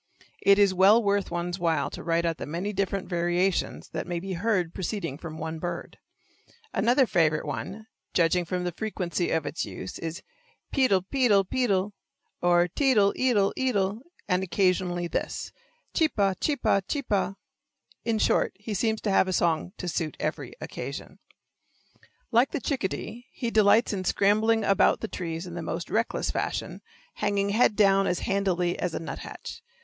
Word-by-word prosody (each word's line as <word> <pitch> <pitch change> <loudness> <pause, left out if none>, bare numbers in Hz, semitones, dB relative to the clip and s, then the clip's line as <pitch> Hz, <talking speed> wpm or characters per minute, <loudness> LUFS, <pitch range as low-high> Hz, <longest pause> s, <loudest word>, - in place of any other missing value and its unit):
It 200 0 +6
is 200 -2 +5
well 200 +5 +6
worth 200 -1 +1
one's 175 +1 -3
while 165 -4 0
to - - -7
write 170 0 0
out 165 -1 0
the - - -5
many 180 +7 -3
different 195 0 -1
variations 175 +1 0
that 160 - -4
may 175 -1 -2
be 190 +2 -5
heard 180 -2 0
proceeding 185 -6 -3
from 160 -2 -7
one 160 0 -4
bird. 175 +2 -5 0.7
Another 250 +4 +4
favorite 160 -7 +2
one, 215 +3 -5 0.3
judging 175 +1 +2
from 180 +1 -3
the 175 - -1
frequency 180 -2 -2
of 160 -2 0
its 145 +3 -3
use, 95 -3 -7
is: 165 +1 -5 0.5
Pe 265 -2 +3
dl', 195 -5 +3
pe 265 0 +2
dl', 200 -3 +5
pe 255 +3 0
dl', 195 0 +1 0.5
or 175 0 +4
te 265 - +2
dl', 200 -1 +4
e 260 0 +2
dl' 200 -4 +2
e 260 -1 +1
dl', 200 -1 0 0.3
and 180 -1 +2
occasionally 180 -2 +1
this: - - -3 0.4
Chee 320 - +4
pa, 200 -8 +1
chee 300 - +1
pa, 200 -6 +2
chee 285 -2 -2
pa. 195 -3 0 0.7
In 230 -2 0
short, - - +2
he 210 +2 -6
seems 220 +2 0
to 205 - 0
have 190 - +4
a - - -1
song 170 0 +1
to 180 - -5
suit 160 -2 -2
every - - -3
occasion. - - -7 1.1
Like 240 +3 +4
the 310 - -3
chickadee, 240 -1 -3
he 235 -3 -3
delights 220 +2 +4
in 190 -2 -2
scrambling 215 +4 +3
about 195 -1 +3
the 220 - -2
trees 165 -3 -5
in 175 - -8
the 170 - -4
most 165 +1 -4
reckless 230 +1 0
fashion, - - -3 0.4
hanging 200 -1 0
head 215 +1 +3
down 195 -2 +4
as 180 - 0
handily 180 -3 0
as 180 -3 -2
a - - -2
nuthatch. 165 - -7
195 Hz, 180 wpm, -27 LUFS, 175-215 Hz, 1.1 s, It